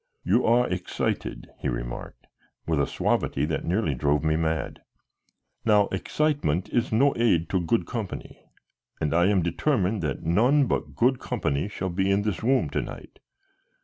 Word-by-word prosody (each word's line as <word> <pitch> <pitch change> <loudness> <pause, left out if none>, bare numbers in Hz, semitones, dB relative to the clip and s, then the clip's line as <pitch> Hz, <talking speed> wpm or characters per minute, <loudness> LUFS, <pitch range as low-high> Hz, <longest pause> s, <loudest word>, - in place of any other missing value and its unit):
"You 125 - +2
are 120 +2 +4
excited," 90 0 -3
he - - -2
remarked, - - -6 0.4
with 80 -3 0
a 70 - +1
suavity 70 - 0
that 80 +1 -2
nearly 90 -3 0
drove 75 +4 +1
me 80 0 +2
mad. 80 0 -2 0.8
"Now 105 -2 +4
excitement 95 - 0
is 120 0 0
no 135 +6 +4
aid 100 -8 +2
to 95 - +1
good 110 +7 +1
company, 110 -6 -6 0.6
and 75 -1 -1
I 85 +2 +4
am 100 -3 +2
determined 100 - 0
that 75 - -3
none 125 - +3
but - - -2
good 125 +2 +2
company 70 +6 -1
shall 95 -2 -4
be 95 +2 0
in 100 +1 +2
this 105 -4 -2
room 130 +4 +2
to - - 0
night. - - -10
95 Hz, 160 wpm, -26 LUFS, 80-115 Hz, 0.8 s, are